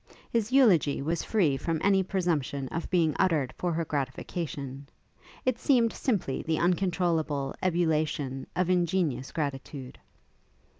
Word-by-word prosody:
His 230 -1 0
eulogy 200 - +4
was 165 +2 -1
free 175 -11 +2
from 160 +3 -1
any 195 -1 +4
presumption 165 -8 -1
of 165 - -4
being 165 -5 +2
uttered 155 -9 +2
for 175 - -1
her 165 0 -1
gratification; 140 -1 -4 0.6
it 255 -2 +1
seemed 240 -5 +3
simply 200 - -1
the 160 -1 -1
uncontrollable 170 -5 0
ebullition 155 -6 0
of 185 -1 +1
ingenuous 170 -7 0
gratitude. 140 -3 -5
165 Hz, 120 wpm, -28 LUFS, 140-185 Hz, 0.6 s, eulogy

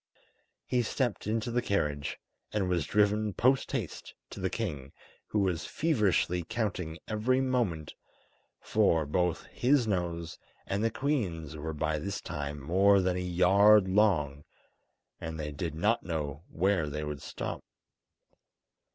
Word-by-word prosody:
He 125 - +1
stepped 120 -2 -1
into 110 +2 -1
the 120 +1 +1
carriage, 75 -10 -1 0.3
and 100 -3 0
was 85 -5 0
driven 105 0 +2
post 130 +5 +2
haste 115 - -4 0.2
to - - -8
the 95 0 0
king, 75 - -4 0.3
who - - -2
was 90 -5 0
feverishly 105 - +1
counting 95 -5 -3
every 115 +4 +1
moment, 120 - -1 0.7
for 90 -7 +2
both 90 +3 0
his 130 0 +3
nose 85 -5 -2 0.3
and 100 +2 -1
the 115 - +3
queen's 95 - -2
were 80 +1 -4
by 75 0 -1
this 100 +5 -3
time 75 0 -5
more 95 +7 +4
than 90 -1 +1
a - - -1
yard 95 +3 +5
long, 85 -8 +2 0.8
and 80 -1 -5
they 75 -1 -3
did 80 +2 -4
not 105 +8 +2
know 75 -2 -4
where 90 -3 +1
they 75 +1 -4
would 75 -2 -5
stop. - - -5
95 Hz, 140 wpm, -30 LUFS, 80-110 Hz, 0.8 s, yard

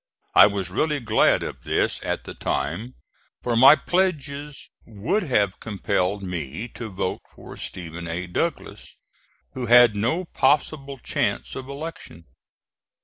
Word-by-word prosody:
I - - +9
was 100 -3 -3
really 150 +8 0
glad 115 -3 +3
of - - -7
this - - 0
at - - -2
the - - -8
time, 105 - -3 0.5
for 120 -1 0
my 130 +5 +9
pledges 150 -6 -2
would 115 - -1
have 105 - 0
compelled 100 -2 -1
me 85 - -4
to 115 0 -7
vote 95 -1 -3
for - - -12
Stephen 85 -1 -7
A. 85 +2 -3
Douglas, 90 - -4 0.6
who 125 -2 -4
had 120 -2 +7
no 125 - 0
possible 140 -2 0
chance 60 - -2
of 130 0 -7
election. 140 - -8
115 Hz, 135 wpm, -24 LUFS, 95-140 Hz, 0.6 s, I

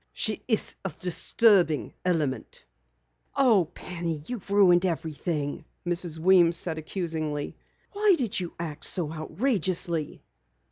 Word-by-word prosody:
She 215 - 0
is 220 -4 +1
a 195 - -2
disturbing 180 -2 +2
element." 155 - -2 0.7
"Oh, 225 -10 +4
Penny, 170 -4 -5
you've 230 -4 -6
ruined 190 -3 +5
everything," 160 -3 -2 0.3
said 175 - +1
Mrs. 170 -2 -3
Weems 170 0 +4
accusingly. 160 -3 -3 0.4
"Why 410 -2 +3
do 250 - 0
you 175 -2 -3
act 160 -4 -6
so 160 -4 +1
outrageously?" 170 - -1
175 Hz, 110 wpm, -26 LUFS, 160-195 Hz, 0.7 s, ruined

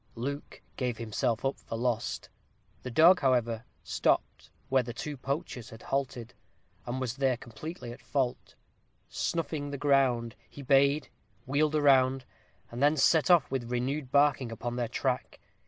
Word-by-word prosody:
Luke 140 +5 -5
gave 125 -3 -1
himself 115 +1 -1
up 135 - -1
for 115 - -6
lost. 120 -1 -2 0.5
The 125 - -6
dog, 170 +9 +6
however, 120 -3 +1 0.2
stopped - - 0 0.2
where 130 0 +3
the 120 -1 -7
two 150 +3 -5
poachers 130 -3 -4
had 115 -2 -12
halted, 130 -4 -3 0.5
and 125 +2 -2
was 130 -1 -3
there 135 -2 +2
completely 120 +2 -8
at 120 - -11
fault: 130 -4 -2 0.5
snuffing 155 -3 -2
the 140 - -4
ground, 130 -4 +2
he 140 - -10
bayed, 140 +2 +3 0.4
wheeled 150 +3 +1
round, 135 -3 +4 0.5
and 120 +2 -6
then 145 +2 +4
set 160 +4 +4
off 175 -6 +5
with 125 -3 -2
renewed 130 +2 -2
barking 140 -4 +3
upon 120 +1 -4
their 120 -1 -1
track. 125 +2 -2
130 Hz, 150 wpm, -29 LUFS, 120-140 Hz, 0.5 s, dog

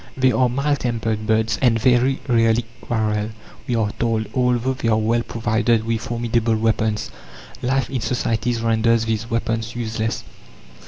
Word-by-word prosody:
"They 130 0 +4
are 125 +2 +2
mild 140 +3 0
tempered 110 -3 -2
birds, 110 0 +1
and 120 -3 +3
very 125 +3 +3
rarely 115 -1 +3 0.2
quarrel" 110 -2 -1 0.4
we 120 - 0
are 110 -2 +1
told 115 -2 0
although 125 0 +1
they 125 -3 -3
are 110 -1 +3
well 115 +2 +1
provided 115 0 0
with 115 -1 -1
formidable 115 0 0
weapons. 110 -1 0 0.5
Life 130 0 0
in 130 -3 -3
societies 115 -1 -1
renders 115 0 +2
these 110 +1 -2
weapons 115 -1 -2
useless. 110 -1 -2
115 Hz, 150 wpm, -21 LUFS, 110-120 Hz, 0.5 s, They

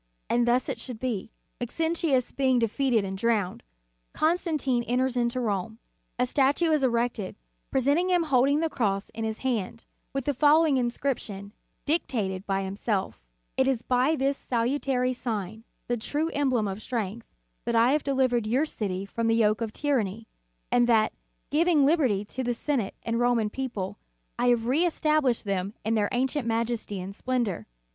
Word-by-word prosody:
And 240 0 +3
thus 245 +2 +2
it - - -3
should 250 -4 -6
be. 230 -5 -3 0.3
Maxentius 310 0 0
being 260 -2 +2
defeated 235 -1 +1
and 190 0 -4
drowned, 210 -3 0 0.5
Constantine 310 -6 +1
enters 255 +1 +1
into 240 +1 0
Rome. 220 -2 -2 0.4
A 250 - +2
statue 285 +6 +2
is 305 -2 +3
erected, 235 -5 0 0.4
representing 285 +8 +2
him 355 -2 +3
holding 280 0 +3
the 325 - +2
cross 200 -6 -1
in 225 0 -5
his 220 0 -3
hand, 230 -3 -2 0.3
with 275 -2 -3
the 290 - +1
following 300 +1 +4
inscription 235 -5 -2 0.3
dictated 210 - -1
by 195 -1 0
himself: 195 +1 -2 0.4
"It 265 0 +3
is 255 -4 0
by 255 +5 +2
this 275 -1 0
salu 245 +4 0
tary 255 -1 +1
sign, 220 -3 -4 0.2
the 240 - 0
true 295 +8 -1
emblem 260 -7 +1
of 195 +2 -5
strength, 225 -2 -4 0.4
that 235 0 0
I 230 +3 +5
have 300 +1 +2
delivered 255 -5 +1
your 260 +7 +2
city 195 -9 -3
from 230 +3 -2
the 225 - +3
yoke 215 -1 +2
of 225 -2 -2
tyranny, 225 -6 -1 0.5
and 240 -1 +4
that, 220 -2 +4 0.4
giving 310 -1 +4
liberty 260 - +2
to 260 +5 -5
the 245 -1 -1
Senate 240 -6 -1
and 230 0 -1
Roman 240 -3 +2
people, 235 -8 -4 0.4
I 245 - +2
have 240 -1 +4
reestab 310 +2 +2
lished 250 -5 +1
them 200 0 -2
in 220 - +1
their 210 -2 +2
ancient 260 +1 0
majesty 225 -3 -1
and 185 +2 -6
splendor." 225 - -2
245 Hz, 165 wpm, -27 LUFS, 220-275 Hz, 0.5 s, I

